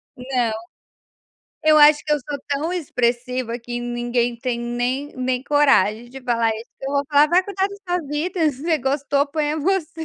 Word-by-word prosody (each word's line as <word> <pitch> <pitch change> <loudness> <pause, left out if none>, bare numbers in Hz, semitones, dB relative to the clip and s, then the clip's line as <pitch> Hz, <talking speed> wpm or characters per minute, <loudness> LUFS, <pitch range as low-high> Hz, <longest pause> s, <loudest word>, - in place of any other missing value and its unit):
Não, 250 -3 -1 1.1
eu 310 0 +6
acho 295 0 +6
que 300 - 0
eu 295 - +2
sou 285 +2 -5
tão 295 +5 -1
expressiva 250 -5 -1
que 240 +1 -5
ninguém 240 0 -1
tem 245 -2 -2
nem 245 +4 -2
nem 255 0 -1
coragem 255 -6 +3
de 270 +1 -9
falar 230 -2 +1
isso, 225 +2 -10
que 270 - -6
eu - - -3
vou 280 0 +1
falar: 295 +1 +5
"Vai 360 +3 +4
cuidar 390 -1 -1
da 400 - -9 0.2
sua 310 - -8
vida, 320 +2 0
se 270 +1 -11
você 325 -2 +1
gostou 280 +2 0
ponha 300 +1 -1
você." 325 -1 -1
275 Hz, 185 wpm, -21 LUFS, 240-300 Hz, 1.1 s, eu